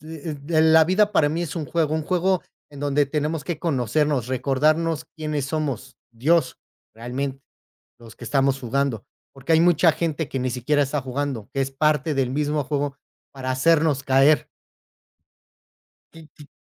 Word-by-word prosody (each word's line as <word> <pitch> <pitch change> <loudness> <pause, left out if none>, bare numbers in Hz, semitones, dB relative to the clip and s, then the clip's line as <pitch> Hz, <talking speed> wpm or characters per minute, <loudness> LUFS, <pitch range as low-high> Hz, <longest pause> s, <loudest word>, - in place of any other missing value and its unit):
eh, 155 -1 -7
la 160 0 +5
vida 210 +3 +2
para 145 -6 +3
mí 165 +3 -2
es 150 -4 -5
un 155 -3 -3
juego 155 0 0
un 160 -1 -2
juego 185 +1 +1 0.3
en 145 -1 -11
donde 145 0 +2
tenemos 150 +1 -2
que 170 -4 -4
conocernos, 145 - 0
recordarnos 150 +5 +1
quiénes 150 -3 -3
somos 140 -4 -4
Dios, 135 +5 +1 0.4
realmente 130 +4 -5 0.6
los 115 -2 -14
que - - -10
estamos 135 -1 +1
jugando, 125 -3 -1 0.3
porque 135 +4 -2
hay 160 - +5
mucha 170 -1 +4
gente 160 -2 -2
que 135 - -2
ni 130 0 -1
siquiera 130 +4 0
está 140 0 -2
jugando, 130 -3 -4
que 135 - -2
es 135 0 -1
parte 150 +2 +1
del 130 -2 0
mismo 150 +1 -1
juego, 145 0 -2 0.3
para 130 -1 -5
hacernos 150 +1 +2
caer. 135 +3 +4 1.7
Y 160 -2 -14
y 150 -1 -13
145 Hz, 160 wpm, -23 LUFS, 135-160 Hz, 1.7 s, la